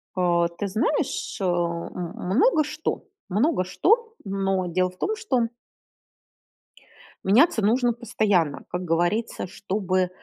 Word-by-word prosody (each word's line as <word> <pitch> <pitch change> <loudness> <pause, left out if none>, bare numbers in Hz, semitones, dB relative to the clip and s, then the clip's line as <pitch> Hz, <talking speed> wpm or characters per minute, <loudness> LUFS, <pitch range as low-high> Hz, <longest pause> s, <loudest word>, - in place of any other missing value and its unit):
А, 175 -2 +2
ты 170 +4 -5
знаешь, 270 +8 -1
э, - - -1
м 175 0 -2
много 270 - +3
что. 305 +2 -4 0.2
Много 215 - +2
что, 445 - +1
но 195 -1 0
дело 185 +1 +1
в 185 - -18
том 435 - -1
что 260 - 0 1.7
меняться 240 - +4
нужно 240 +4 +3
постоянно. 205 - 0
Как 180 +1 -3
говорится, 175 +7 0
чтобы 185 -1 -1
195 Hz, 115 wpm, -25 LUFS, 180-245 Hz, 1.7 s, меняться